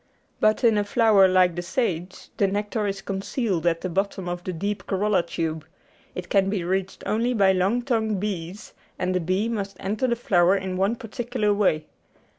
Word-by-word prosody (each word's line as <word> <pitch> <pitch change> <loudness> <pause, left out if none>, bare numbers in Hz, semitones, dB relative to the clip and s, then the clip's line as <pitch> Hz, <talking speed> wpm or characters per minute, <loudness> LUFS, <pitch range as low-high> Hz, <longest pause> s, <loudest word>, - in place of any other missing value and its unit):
But 215 +4 +2
in 225 -3 +4
a - - +1
flower 205 -2 +5
like 185 -2 +3
the 175 - -2
sage 180 - -3
the 200 - +3
nectar 205 +2 -2
is 195 -1 -4
concealed 195 - -2
at 165 -1 +1
the - - -2
bottom 195 0 -2
of 175 0 -4
the 185 - -3
deep 200 +4 -4
corolla 200 0 +2
tube; 160 -2 -3 0.5
it 180 -1 -5
can 195 +1 +2
be 195 -3 -1
reached 190 +2 -2
only 235 +3 0
by 195 -3 +4
long 195 +6 +1
tongued 220 -5 0
bees, 190 -1 -5 0.2
and 185 0 -1
the 180 - +1
bee 185 +5 0
must 200 -4 -4
enter 210 +6 -1
the 240 - +1
flower 190 -5 +3
in 190 -1 -4
one 195 +5 +1
particular 230 -1 -2
way. 185 -7 +1
195 Hz, 190 wpm, -24 LUFS, 180-215 Hz, 0.5 s, flower